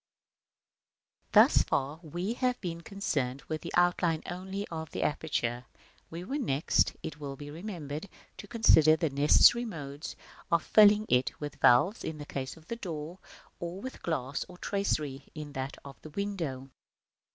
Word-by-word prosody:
§ - - -64
I. - - -5
Thus - - +3
far 140 +4 -1
we 175 +6 -3
have 250 0 0
been 170 -2 -5
concerned 145 -9 -2
with 155 -1 -4
the 170 - -6
outline 175 -2 +2
only 190 +3 -5
of 160 -2 -5
the - - -3
aperture: 125 -6 -1 0.4
we 170 +2 -6
were 275 +10 -3
next, 145 - +1
it 150 -1 -6
will 140 -2 -5
be 145 +1 -9
remembered, 165 -1 -6 0.3
to - - -9
consider 160 -9 +5
the 160 -2 -1
necessary 150 - +6
modes 145 -9 -6 0.4
of 170 -1 +3
filling 210 0 +6
it 125 +1 +1
with 150 -1 -7
valves 145 - +5
in 160 - -4
the 145 - -7
case 135 +1 -5
of 160 - -17
the 235 - -5
door, 170 -3 -6 0.4
or 175 +2 -5
with 260 +5 -8
glass 140 -5 -2
or 180 - -12
tracery 150 -9 -2
in 150 -2 -7
that 135 +1 -4
of 140 -1 -11
the 155 - -10
window. 155 -8 -4
160 Hz, 165 wpm, -30 LUFS, 145-190 Hz, 0.4 s, necessary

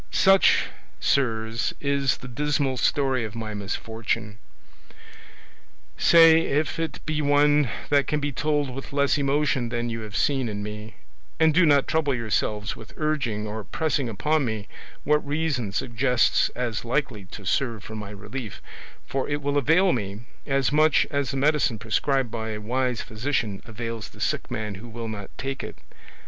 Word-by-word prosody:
"Such, 195 0 +5 0.3
sirs, 115 -4 0
is 140 -2 +1
the 125 - -10
dismal 140 +1 0
story 135 -1 +1
of 110 -1 -6
my 110 -2 -5
misfortune: 110 +1 -3 1.6
say 165 -1 +7
if 155 +1 -1
it 165 -1 -4
be 155 -1 -1
one 145 -1 +4 0.2
that 140 -1 +3
can 150 - 0
be 145 0 -2
told 145 0 0
with 135 +2 -8
less 140 +1 +2
emotion 140 -3 +1
than 120 0 -2
you 115 - -3
have 110 -1 -5
seen 135 -4 +1
in 105 -1 -4
me; 105 0 -7 0.4
and 160 -1 +5
do 170 +1 +5
not 145 -2 +4
trouble 150 -4 +1
yourselves 105 -2 -1
with 110 - -13
urging 140 -9 -1
or 110 0 -5
pressing 145 - -1
upon 150 +8 +1
me 110 -4 -3 0.4
what 150 +1 +4
reason 145 -7 -1
suggests 120 +3 +2
as 120 -3 -2
likely 120 -5 -2
to 95 +3 -10
serve 115 +1 0
for 110 - -9
my 105 -2 -6
relief, 105 +3 -7 0.5
for 135 -1 -2
it 145 0 0
will 145 0 0
avail 165 +7 +4
me 100 -2 -4 0.3
as 135 -1 +1
much 155 0 +4
as 140 -2 0
the 135 - -2
medicine 145 -4 +2
prescribed 115 +4 0
by 110 -1 -4
a 105 - -5
wise 125 +2 -1
physician 110 -3 -2
avails 115 -1 -5
the - - -17
sick - - -1
man 110 -1 -3
who 100 +5 -10
will 115 0 -6
not 100 -3 -6
take 135 0 -4
it. - - -7
125 Hz, 165 wpm, -25 LUFS, 110-145 Hz, 1.6 s, say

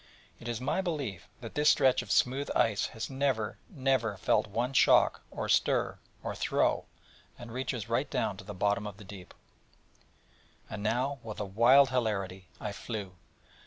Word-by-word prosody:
It 120 - -9
is 120 -2 -2
my 150 +8 0
belief 140 - -4
that 115 - -8
this 150 0 +4
stretch 130 -1 +4
of - - -7
smooth 135 +3 +2
ice 105 -3 +2
has 110 -2 -5
never, 135 -5 -1
never 130 - 0
felt 100 - +2
one 120 +6 -2
shock, 125 - +5
or - - -4
stir, - - +2 0.2
or - - -3
throe, - - +1 0.5
and 120 -1 -10
reaches 125 -2 -3
right 125 +5 0
down 100 - -1
to 100 - -9
the 100 0 -8
bottom 105 +3 0
of 105 -1 -8
the 105 - -12
deep. 95 -2 -11 1.4
And 105 - -5
now 125 +6 0
with 110 -2 -7
a 105 - -2
wild 125 +7 +5
hilarity 100 -7 -2
I 105 - -4
flew. 100 -3 -6
115 Hz, 165 wpm, -30 LUFS, 105-130 Hz, 1.4 s, shock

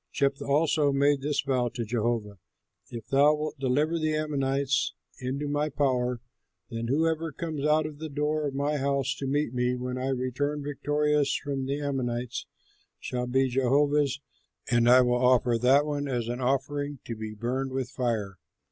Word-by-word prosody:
Jephthah 140 -1 0
also 145 0 +3
made 140 0 +2
this 145 +1 0
vow 130 -3 0
to 120 -2 -2
Jehovah: 110 -3 -2 0.5
"If 115 -2 -7
thou 145 +2 +5
wilt 150 -1 -4
deliver 145 +5 +1
the 155 -1 0
Ammonites 140 -2 0 0.2
into 135 +3 -3
my 145 +1 0
power, 125 -4 0 0.5
then 115 0 -3
whoever 160 +4 +1
comes 155 -1 -4
out 155 0 +3
of 150 -1 -7
the 160 0 -5
door 150 +1 -1
of 135 - -5
my 145 +2 0
house 140 -1 0
to 135 - -3
meet 145 -2 0
me, 125 0 +1
when 125 0 -4
I 130 - -2
return 135 +3 -1
victorious 145 0 +1
from 135 -2 -3
the 140 +2 -1
Ammonites, 125 -4 -3 0.5
shall 125 0 -3
be 130 +2 +2
Jehovah's, 140 +2 +2 0.5
and 120 0 +4
I 125 +1 +8
will 125 0 +2
offer 125 -2 +4
that 135 +5 +4
one 145 -1 -2
as 120 -4 -2
an 120 +2 -3
offering 140 +2 -1
to 115 - -4
be 110 0 -6
burned 130 +4 -2
with 130 -1 -3
fire." 110 -8 -2
135 Hz, 170 wpm, -27 LUFS, 125-145 Hz, 0.5 s, I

